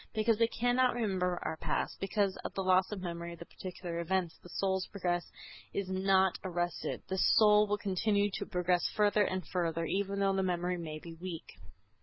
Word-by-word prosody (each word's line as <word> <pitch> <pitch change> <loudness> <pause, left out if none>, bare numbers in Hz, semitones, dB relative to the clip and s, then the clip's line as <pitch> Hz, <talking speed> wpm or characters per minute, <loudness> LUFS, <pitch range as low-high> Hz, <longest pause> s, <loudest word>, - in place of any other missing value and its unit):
Because 220 0 +2
we 230 - +5
cannot 245 +2 +2
remember 185 -6 0
our 160 - -3
past, - - -2
because 195 0 0
of - - -7
the 195 - -1
loss 185 +1 +3
of 195 -3 -5
memory 170 -1 -4
of - - -11
the 170 - -9
particular 180 -2 -6
events, 175 0 -1
the 180 - -13
soul's 190 0 -1
progress 175 -3 -2 0.4
is 200 -2 -2
not 190 0 +3
arrested. 175 -1 -2
The 190 0 -2
soul 210 +1 +6
will 205 0 +1
continue 205 +1 +1
to - - -4
progress 180 -2 +1
further 210 0 +3
and 185 -1 -2
further, 165 -2 -1
even 200 +3 -1
though 195 -1 +3
the 190 - +1
memory 180 -1 -1
may 155 -2 -5
be 165 +2 -9
weak. 170 0 -7
190 Hz, 190 wpm, -32 LUFS, 175-200 Hz, 0.4 s, soul